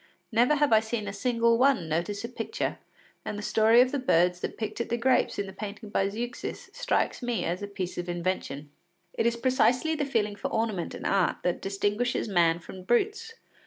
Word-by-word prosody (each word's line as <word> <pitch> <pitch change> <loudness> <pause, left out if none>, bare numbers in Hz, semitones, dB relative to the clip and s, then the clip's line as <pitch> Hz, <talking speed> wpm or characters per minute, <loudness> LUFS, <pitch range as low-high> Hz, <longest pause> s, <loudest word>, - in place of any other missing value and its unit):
Never 240 +6 +4
have 295 -4 +3
I 220 - +7
seen 220 -1 -3
a 200 - -4
single 230 +1 +2
one 260 -10 +3
notice 175 +7 -2
a - - -6
picture, 235 -3 -3 0.4
and 205 - -4
the 205 - -6
story 225 +3 +5
of 255 0 +3
the 285 - -1
birds 180 -7 +3
that - - -5
picked 215 +1 -3
at - - -4
the 235 - 0
grapes 250 +1 +2
in 200 - -1
the 190 - -9
painting 210 +2 -7
by 195 -1 +1
Zeuxis, 240 +4 -5
strikes - - 0
me 240 -2 -1
as 175 +3 -2
a 205 - -4
piece 185 -3 -5
of 175 0 -4
invention. 170 -5 -3 0.4
It 230 - +1
is 235 0 0
precisely 260 +4 +2
the 300 -2 -1
feeling 210 -6 0
for 205 - -3
ornament 220 -6 -2
and - - -8
art 195 -3 +1
that 180 - 0
distinguishes 205 +6 -1
man 170 -4 +3
from 185 +2 -10
brutes. 425 - 0
215 Hz, 205 wpm, -28 LUFS, 190-245 Hz, 0.4 s, I